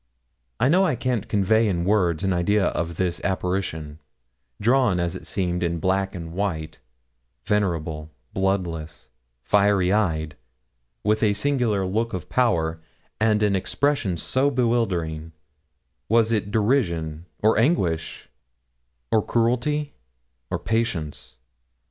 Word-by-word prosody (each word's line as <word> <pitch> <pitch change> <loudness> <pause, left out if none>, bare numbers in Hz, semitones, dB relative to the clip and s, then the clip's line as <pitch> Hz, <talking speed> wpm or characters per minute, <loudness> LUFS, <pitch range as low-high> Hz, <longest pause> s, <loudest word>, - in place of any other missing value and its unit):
I 125 - +3
know 180 +7 +4
I 185 - +2
can't 120 -4 -2
convey 110 +2 +3
in 85 -4 0
words 95 -4 +2
an 95 -1 +1
idea 95 +2 +2
of 85 0 -3
this 90 0 -2
apparition, 90 -5 -2 0.6
drawn 120 -4 +3
as 85 -1 -1
it - - -9
seemed 90 -2 -1
in 85 -1 0
black 95 +3 0
and 85 -2 -6
white, 85 -5 -3 0.7
venerable, 80 -7 -1 0.2
bloodless, 85 -5 -2 0.3
fiery 100 -2 +3
eyed, 80 -7 0 0.7
with 105 +1 +1
its 105 -2 +2
singular 120 -9 +1
look 110 +5 -1
of 90 - -7
power, 85 -10 +1 0.4
and 110 -1 +3
an 100 -2 +3
expression 100 -1 0
so 130 - +1
bewildering 95 - -1 0.8
was 115 0 +3
it 105 -2 0
derision, 90 - 0
or 110 0 +3
anguish, 90 - 0 0.8
or 110 -2 +3
cruelty, 125 +6 0 0.6
or - - -1
patience? 85 - -3
95 Hz, 120 wpm, -24 LUFS, 85-115 Hz, 0.8 s, know